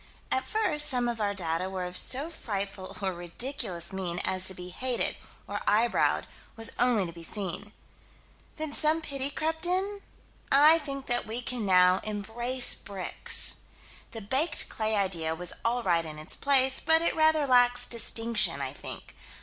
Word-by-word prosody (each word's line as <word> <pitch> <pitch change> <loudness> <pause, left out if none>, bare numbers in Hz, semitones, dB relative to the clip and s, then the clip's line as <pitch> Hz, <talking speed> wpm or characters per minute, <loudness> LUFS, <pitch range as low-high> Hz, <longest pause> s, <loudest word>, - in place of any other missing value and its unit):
At 260 - -1
first 365 -9 +2
some 250 -3 +2
of 235 -2 -3
our 205 -1 -1
data 170 0 -2
were 190 -1 -4
of 180 0 -6
so 280 - +2
frightful 195 - -5
or 190 -1 -1
ridiculous 175 - -2
mien 180 -2 -3
as 185 0 +5
to 190 - +2
be 180 0 -8
hated, 250 +6 -2 0.3
or - - -4
eyebrowed, 225 +3 +2 0.3
was 225 0 -2
only 240 -5 +3
to 170 - -7
be 170 - -11
seen. 200 +3 -4 0.8
Then 310 -2 -5
some 310 +2 +2
pity 275 -2 -1
crept 320 +3 -3
in? 390 +3 -2 0.5
I 305 +4 +6
think 275 -3 -7
that 240 -2 -2
we 225 +2 -4
can 240 -4 -2
now 180 0 +5
embrace 235 +5 +1
bricks. 195 -2 -1 0.5
The 225 - -8
baked 265 +10 +1
clay 220 0 0
idea 170 -5 0
was 180 +1 -1
all 240 +1 0
right 170 -4 +1
in 155 -1 -8
its 155 - -5
place, 265 -2 +3
but 320 +1 +3
it - - +1
rather 315 -2 +3
lacks 245 -2 +4
distinction, 230 -1 +1
I - - -3
think. - - -9
230 Hz, 165 wpm, -28 LUFS, 190-275 Hz, 0.8 s, I